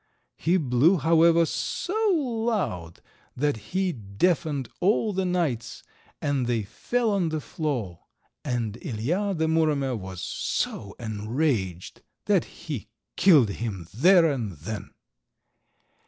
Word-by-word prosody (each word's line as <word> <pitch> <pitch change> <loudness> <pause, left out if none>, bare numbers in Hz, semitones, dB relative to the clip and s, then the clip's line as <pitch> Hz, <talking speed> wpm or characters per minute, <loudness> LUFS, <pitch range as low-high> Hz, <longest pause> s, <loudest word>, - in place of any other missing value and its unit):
He 170 +4 +2
blew, 150 +4 +3
however, 165 +2 +5
so 355 - -3 0.2
loud 225 - -2 0.4
that 145 +1 +1
he 190 0 0
deafened 135 - 0
all 210 +3 +2
the 190 0 0
knights 140 -10 -1 0.4
and 140 -5 0
they 115 -3 0
fell 235 - -1
on 190 -5 +1
the 155 0 -2
floor, 130 - -3 0.4
and 120 -3 -2
Ilija, 175 - -1
the 160 - +1
Muromer, 150 -5 +1
was 95 -3 -7
so 100 -1 -3
enraged 110 - -2 0.2
that - - +3
he - - -7 0.3
killed 150 - +6
him 100 -6 -5
there 175 - +6
and 115 -8 -3
then. 95 +8 -6
145 Hz, 115 wpm, -26 LUFS, 110-175 Hz, 0.4 s, killed